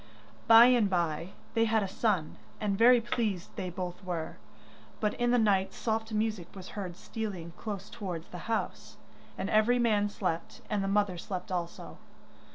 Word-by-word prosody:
By 230 0 +10
and 240 -5 +4
bye 170 0 -1 0.2
they 225 -1 +3
had 220 -1 +2
a - - -2
son, 190 -5 0 0.2
and 205 -2 0
very 240 +4 +7
pleased 220 -6 -2
they 185 - -3
both 180 +1 -5
were. 175 -3 -4 0.6
But 210 -1 +1
in 240 0 0
the 245 - +4
night 200 -4 +2
soft 220 0 -2
music 215 -5 -1
was 190 -1 -9
heard 185 -4 -6
stealing 190 -8 -5
close 205 -2 -5
towards 180 -7 -5
the 180 +5 -8
house, 225 - -3 0.4
and 195 - -2
every 215 +4 +4
man 210 -4 +2
slept, 180 -5 -3
and 205 -2 +1
the - - -1
mother 200 -3 +1
slept 185 +2 -5
also. 175 -2 -4
205 Hz, 165 wpm, -30 LUFS, 180-225 Hz, 0.6 s, By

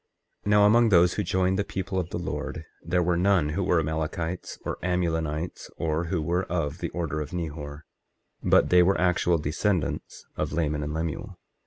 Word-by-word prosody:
24:29 - - -1
Now, 105 0 +6
among 115 +2 +5
those 90 -2 +5
who - - -1
joined 95 +2 +1
the - - +2
people 95 -1 -3
of 90 -2 -3
the - - -3
Lord, 85 - -4 0.2
there 90 +1 +1
were 90 +1 +2
none 90 -3 +3
who 90 +6 -1
were 90 -2 +3
Amalekites 80 +3 -3
or - - -3
Amulonites, 85 -2 -2
or 80 +1 -1
who 85 -2 -1
were 90 +4 0
of 80 -2 -2
the 85 - -3
order 80 -3 -3
of 75 - -5
Nehor, 75 -3 -5 0.6
but - - +4
they 90 0 +7
were 95 +3 +3
actual 90 -1 +2
descendants 80 +4 -2
of - - -2
Laman 75 -3 0
and 75 +1 -3
Lemuel. 85 +5 -4
85 Hz, 185 wpm, -26 LUFS, 80-95 Hz, 0.6 s, they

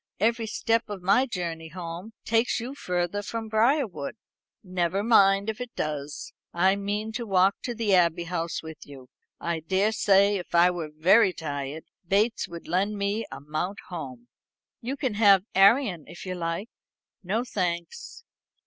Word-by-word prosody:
Every 225 +2 +1
step 225 +1 0
of 200 -3 -6
my 205 +8 +4
journey 170 -6 -4
home 175 +5 -7
takes 225 +2 +2
you 245 +4 -5
further 180 -5 -2
from 225 +2 -5
Briarwood." 220 - +1 0.5
"Never 185 +1 -1
mind 200 -3 +5
if 220 +2 -3
it 250 -1 -7
does. 150 -1 -4 0.2
I 190 +3 +4
mean 205 +2 -3
to 230 +1 -5
walk 190 0 +3
to 240 - -4
the 220 -3 +1
Abbey 170 -2 +3
House 165 -1 -3
with 160 -1 -9
you. 135 -3 -13 0.3
I 170 -1 -2
daresay, 200 +3 +3
if 180 - -6
I 175 +1 +6
were 170 -3 -5
very 185 +6 +4
tired, 145 -1 -5 0.2
Bates 210 +5 +1
would 170 -1 -9
lend 200 +4 0
me 200 +3 -1
a - - -7
mount 155 +7 -3
home." 130 -9 -7 0.5
"You 260 +4 -4
can 260 -6 -1
have 200 -3 +5
Arion, 195 - +4
if 175 +4 -10
you 185 - -3
like." 170 +5 -3 0.5
"No, 210 +6 0
thanks. 175 -7 -4
190 Hz, 155 wpm, -26 LUFS, 170-220 Hz, 0.5 s, I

